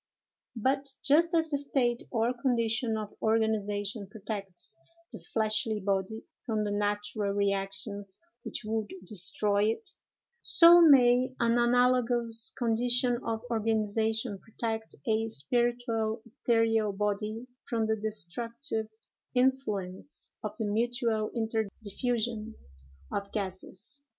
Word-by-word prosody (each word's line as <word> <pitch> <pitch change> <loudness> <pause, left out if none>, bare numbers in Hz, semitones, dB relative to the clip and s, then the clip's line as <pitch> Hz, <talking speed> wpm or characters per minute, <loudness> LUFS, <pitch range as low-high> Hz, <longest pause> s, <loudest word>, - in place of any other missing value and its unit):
But, 270 +4 0
just 325 +4 +4
as 325 -1 +2
the 285 - +3
state 245 -4 0
or 230 +1 +1
condition 235 -2 0
of 215 -1 -6
organization 210 -2 0
protects 200 -2 -5 0.4
the - - -7
fleshly 215 0 +1
body 195 +2 -2 0.2
from 220 -3 -1
the 205 - -2
natural 205 0 -1
reactions 200 0 -2 0.2
which - - 0
would 220 -1 -2
destroy 205 +2 +2
it, 225 - -1 0.5
so 345 +1 +7
may 255 -4 +6
an 235 0 +3
analogous 240 -1 +3
condition 245 +1 +3
of 225 0 -3
organization 220 0 0
protect 225 0 -4
a 220 0 +1
spiritual 225 - 0
ethereal 225 -3 +1
body 210 +3 -2 0.2
from 230 -2 +1
the 220 0 +1
destructive 220 +3 -3 0.5
influence 250 -5 0
of 210 -1 -4
the 220 - -1
mutual 225 0 0
interdiffusion 225 0 -2 0.6
of 200 0 -3
gases. 200 +6 -4
225 Hz, 105 wpm, -29 LUFS, 210-240 Hz, 0.6 s, so